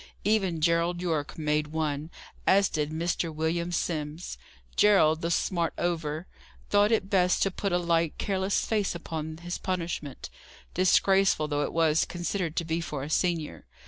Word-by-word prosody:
Even 195 -6 +1
Gerald 170 +2 +2
Yorke 160 -3 -2
made 150 -1 0
one, 155 -1 -2 0.4
as 195 +1 +5
did 150 -2 -1
Mr. 165 +1 -1
William 165 +3 -1
Simms. 155 - -3 0.4
Gerald, 165 -6 +5
the 165 - -1
smart 170 -1 0
over, 160 -2 -2 0.5
thought 205 +1 +4
it 215 -4 +2
best 180 -2 +3
to 195 - +1
put 200 +1 -2
a 175 - +3
light, 170 -2 +1
careless 195 0 0
face 210 -5 0
upon 160 -2 -5
his 175 +1 -5
punishment, 170 -6 -4 0.4
disgraceful 190 -2 +3
though 145 -1 -1
it - - -3
was 160 -1 +3
considered 175 -1 -3
to 170 - -1
be 165 +1 -1
for 150 -4 -4
a 150 - -6
senior. 165 -3 -1
170 Hz, 155 wpm, -28 LUFS, 155-185 Hz, 0.5 s, as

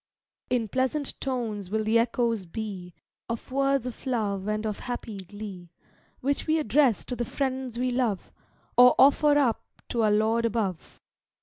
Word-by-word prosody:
In 245 -3 +1
pleasant 260 +5 -1
tones 225 -7 -3
will 220 +2 0
the 220 +2 +3
echoes 230 -4 0
be, 185 -2 -6 0.3
Of 230 +2 -5
words 275 -1 +1
of 250 +2 -7
love 205 -6 -1
and 215 +1 -1
of 210 -2 -3
happy 240 -4 -5
glee, 190 -2 -8 0.5
Which 280 +4 -1
we 315 +1 +3
address 270 -4 +2
to 250 - -4
the 240 - -2
friends 260 -1 -3
we 250 +1 0
love, 240 -6 -1 0.4
Or 250 0 +8
offer 290 +2 +5
up 255 -6 +2 0.3
to 235 - 0
our 215 - +4
Lord 220 +2 +2
above. 210 -7 -2
230 Hz, 160 wpm, -27 LUFS, 210-260 Hz, 0.5 s, Or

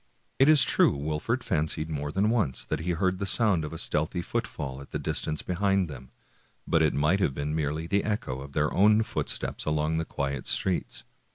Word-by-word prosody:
It 135 +3 +6
is 155 -3 +7
true - - +3
Wolfert 80 - -2
fancied 80 -4 -1
more 75 -1 -3
than 100 +6 +1
once 80 - 0
that - - -2
he 85 +2 -1
heard 95 +2 0
the 100 - -2
sound 100 -7 +3
of 75 - -5
a 80 - -6
stealthy 80 +3 -1
foot - - -2
fall 70 -2 -6
at 70 - -13
a - - +2
distance 75 -1 -1
behind 95 0 +1
them; 65 -2 -10 0.6
but 80 - +2
it 80 -2 +2
might 75 +7 +2
have 70 -9 0
been 75 +1 -2
merely 75 +1 -1
the 100 +4 +1
echo 105 - -2
of 70 0 -10
their 75 +1 +1
own 105 +3 +5 0.2
steps - - -3
along 75 +1 0
the - - 0
quiet 70 -3 -3
streets. 95 -2 -1
80 Hz, 205 wpm, -27 LUFS, 75-95 Hz, 0.6 s, is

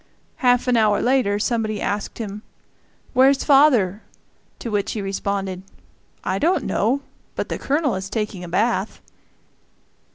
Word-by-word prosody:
Half 250 -1 +2
an 245 -1 +3
hour 210 -2 +3
later 245 -5 +2
somebody 215 -1 -1
asked 205 0 -3
him, 210 -2 -6 0.7
"Where's 265 +1 +4
father?" 250 -9 +4 0.6
to 230 - -6
which 205 -1 -1
he 220 - -4
responded, 195 -1 -3 0.6
"I 190 +1 -1
don't 335 -1 +2
know; 250 +7 0 0.3
but - - -3
the - - -3
Colonel 285 -2 0
is 190 0 -4
taking 210 -4 -3
a 175 - -7
bath." 205 +2 0
215 Hz, 135 wpm, -22 LUFS, 200-255 Hz, 0.7 s, Where's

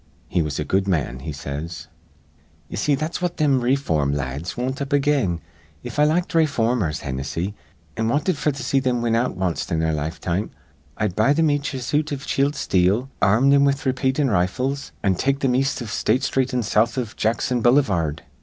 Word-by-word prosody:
He 85 - +1
was 75 -3 -2
a - - -1
good 95 +1 +1
man,' 75 -9 -1
he 80 +4 -5
says. 70 +4 -6 0.8
"Ye - - -6
see, 145 +7 +2
that's 155 +5 -3
what 175 -1 -2
thim 140 -4 +3
rayform 80 - +1
lads 70 - -4
wint 130 +3 -2
up 140 +1 -4
again. 135 - +1 0.4
If 125 +4 -5
I 150 - +6
liked 170 +4 +1
rayformers, 120 - +1
Hinnissy, 70 +8 -3 0.4
an' 110 - -1
wanted 150 +9 +1
f'r 150 +1 0
to 140 -1 -6
see 135 +3 +2
thim 125 -2 0
win 115 -1 +2
out 120 -3 0
wanst 90 -3 -2
in 80 - +1
their 80 0 +1
lifetime, 85 +6 -2 0.5
I'd 105 -4 -1
buy 115 +7 +3
thim 160 -1 +3
each 145 -1 -1
a 130 - -4
suit 150 +5 0
iv 140 -1 -4
chilled 140 +2 +1
steel, 100 +9 +1
ar 100 +2 +4
rm 135 +2 +4
thim 140 0 +5
with 140 0 +1
raypeatin' 130 +1 +1
rifles, 125 +10 -1
an' 100 -2 +3
take 135 +9 0
thim 130 -2 +2
east 135 +2 +1
iv 110 - -7
State 115 +2 +1
Sthreet 130 -2 0
an' 125 -2 0
south 110 +4 +1
iv 120 -4 -3
Jackson 115 +2 0
Bullyvard. 100 - +2
120 Hz, 200 wpm, -22 LUFS, 90-140 Hz, 0.8 s, I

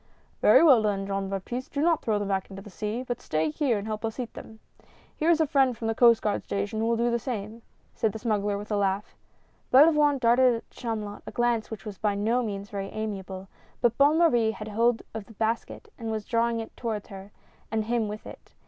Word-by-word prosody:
"Very - - +7
well 270 -8 +7
then, 200 -2 0
Jean 195 0 -2
Baptiste, 220 +6 -5
do 280 - -2
not 330 +1 +2
throw 215 -2 0
them 205 -1 -2
back 190 -1 -1
into 195 0 -9
the 210 - -12
sea, 215 +5 -3
but 245 -2 -4
stay 155 0 -1
here 245 - +1
and 200 - -5
help 215 0 -4
us 225 +2 -4
eat 245 -2 -4
them. 220 0 -11 0.6
Here 315 - 0
is 335 -2 +4
a 320 - +4
friend 270 -5 +2
from 225 - -4
the 225 - +1
Coast 235 0 +5
Guard 210 - 0
station 200 +2 -3
who 225 - 0
will 230 0 +1
do 235 +1 +1
the 235 - +1
same," 225 -2 -5 0.3
said 220 - 0
the 220 - -6
smuggler 210 -3 -1
with 210 +1 -8
a 210 - +1
laugh. 200 0 -1 0.6
Belavoine 295 +1 +6
darted 245 0 +4
at 230 - -8
Chamulot 215 -4 -5
a - - -5
glance 240 -2 0
which 220 -1 -8
was 205 -3 -7
by 210 -2 0
no 225 +5 +1
means 200 -3 -5
very 195 -1 -4
amiable, 195 -3 -5 0.3
but 240 -2 +2
Bonne 290 +3 +5
Marie 240 -10 +4
had 215 -1 -5
hold 230 +2 +1
of 220 -2 -6
the 225 - -15
basket 225 - -3
and 225 -1 -4
was 215 -2 -3
drawing 230 0 +1
it 225 - -7
toward 220 -4 -3
her, 195 +1 -11 0.4
and 220 0 0
him 230 -1 0
with 210 +1 -7
it. - - -13
220 Hz, 230 wpm, -27 LUFS, 205-240 Hz, 0.6 s, Very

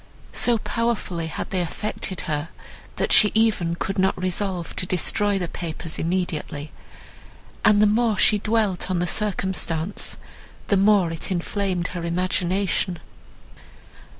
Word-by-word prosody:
So 240 -1 +2
powerfully 220 -8 -2
had 160 - -5
they 185 -2 0
affected 185 +2 -3
her, 155 -2 -3 0.5
that - - 0
she 210 - +7
even 215 -7 +2
could 195 +3 -3
not 190 0 +2
resolve 185 -1 -2
to 180 - -1
destroy 200 +3 +2
the 180 -2 -2
papers 165 -1 -5
immediately; 160 -4 -2 0.9
and 210 -1 +5
the 210 - +6
more 220 0 +2
she 210 +2 +5
dwelt 210 -4 0
on 185 - 0
the 175 - +1
circumstance, 190 -3 -1 0.5
the 200 - +4
more 195 -3 +4
it 165 +3 -5
inflamed 185 0 -1
her 175 -2 -5
imagination. 185 +1 0
185 Hz, 130 wpm, -23 LUFS, 170-205 Hz, 0.9 s, she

